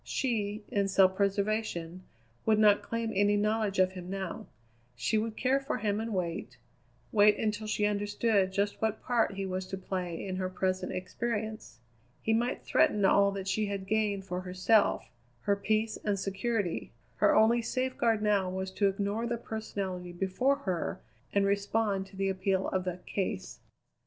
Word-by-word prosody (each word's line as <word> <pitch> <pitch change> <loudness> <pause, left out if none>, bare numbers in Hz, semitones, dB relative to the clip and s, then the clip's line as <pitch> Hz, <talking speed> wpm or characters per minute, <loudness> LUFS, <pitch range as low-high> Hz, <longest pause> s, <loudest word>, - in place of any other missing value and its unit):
She, 215 -4 -1
in 200 -1 +1
self 190 -1 +4
preservation, 200 -3 -1 0.4
would 220 -1 +3
not 210 -1 +5
claim 230 -1 -3
any 205 +1 +3
knowledge 210 -1 0
of 185 0 +4
him 180 -1 -8
now; 195 0 -4 0.5
she 120 - +1
would 220 0 -3
care 265 +2 +2
for 275 -2 -3
him 210 -3 0
and 225 +1 -3
wait 175 -4 -3 0.5
wait 210 0 +5
until 215 0 -2
she 210 0 +1
understood 205 -1 +1
just 200 +1 -1
what 220 -1 -1
part 230 -4 +1
he 195 0 -3
was 185 0 -3
to 195 - -4
play 185 -2 -4
in 185 -1 -3
her 185 0 -1
present 185 0 -1
experience. 215 - -4 0.4
He 225 - 0
might 240 +3 0
threaten 205 -2 +3
all 200 +1 +5
that 195 -1 -5
she 210 +3 0
had 200 -1 -4
gained 205 -2 0
for 180 -1 -3
herself 185 +4 +2 0.3
her 200 - +2
peace 215 +2 0
and 205 -2 0
security. 200 -1 -2 0.3
Her - - +4
only 230 +2 +5
safeguard 235 -3 0
now 200 -3 +2
was 190 +1 -3
to 200 +1 +2
ignore 200 +4 -1
the 235 0 -1
personality 195 -6 -5
before 195 +10 +1
her 180 -3 -2 0.3
and 200 -1 +2
respond 200 0 0
to 195 - -16
the 195 0 0
appeal 190 0 0
of 185 -1 -1
the 180 -1 -2
"case." 185 - -3
200 Hz, 165 wpm, -30 LUFS, 190-220 Hz, 0.5 s, not